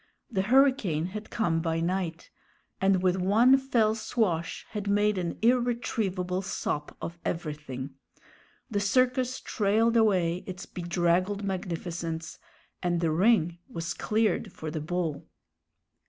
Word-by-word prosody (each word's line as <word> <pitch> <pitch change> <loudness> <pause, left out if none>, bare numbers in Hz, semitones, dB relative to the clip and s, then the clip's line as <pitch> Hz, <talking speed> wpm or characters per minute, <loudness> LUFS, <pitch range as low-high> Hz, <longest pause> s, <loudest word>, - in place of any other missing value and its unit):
The 195 -4 +1
hurricane 235 - +3
had 215 0 -6
come 170 -7 0
by 165 -1 0
night, 170 -1 -2 0.5
and 190 -1 +3
with 185 0 +3
one 215 +8 +5
fell 245 -5 +2
swash 210 -7 -1
had 210 -2 -4
made 205 -1 +2
an 170 -2 -3
irretrievable 225 -7 +1
sop 150 -5 -3
of 170 0 -6
everything. 150 -5 -4 0.8
The 205 - +1
circus 255 +4 +2
trailed 220 +2 +1
away 185 -7 +3
its 185 0 -6
bedraggled 175 +3 0
magnificence, 170 -3 -4 0.4
and 175 -1 0
the 165 -2 +1
ring 175 -1 +3
was 165 0 -4
cleared 220 0 0
for 155 -1 -6
the 155 -1 -3
bull. 165 -2 -3
185 Hz, 125 wpm, -28 LUFS, 170-220 Hz, 0.8 s, one